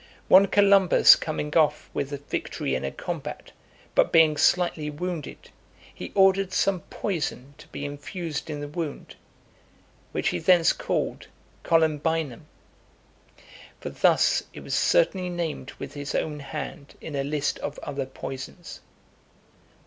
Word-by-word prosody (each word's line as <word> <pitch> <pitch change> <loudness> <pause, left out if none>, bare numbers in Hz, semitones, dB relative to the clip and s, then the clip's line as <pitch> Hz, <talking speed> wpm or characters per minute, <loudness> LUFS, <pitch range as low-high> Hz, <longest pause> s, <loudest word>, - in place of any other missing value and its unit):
One 195 +2 +8
Columbus 200 -3 +6
coming 150 -2 -4
off 155 -3 +2
with 140 - -2 0.2
victory 65 - -3
in 65 - -1
a 70 - -1
combat, - - -6 0.4
but - - +3
being 160 -2 +5
slightly 170 -2 +2
wounded, 165 0 -6 0.4
he - - -8
ordered 195 -1 +4
some 195 -1 +1
poison 150 -8 -3
to - - -14
be 145 - -6
infused 150 +2 -5
in 145 -1 -4
the 145 - -5
wound, 155 0 -6 1.0
which - - 0
he 90 - -2
thence 175 - +4
called - - -3 0.4
Columbinum. 160 -3 0 1.3
For - - -6
thus - - +3
it - - -9
was - - -6
certainly 190 - +2
named 165 -6 -4
with 140 0 -8
his 145 -1 -5
own 150 -2 -2
hand 145 +1 -7
in 150 - -7
a 140 - 0
list 145 +1 -1
of 145 - -5
other 140 -2 -4
poisons. 135 +6 -8
155 Hz, 135 wpm, -25 LUFS, 145-180 Hz, 1.3 s, One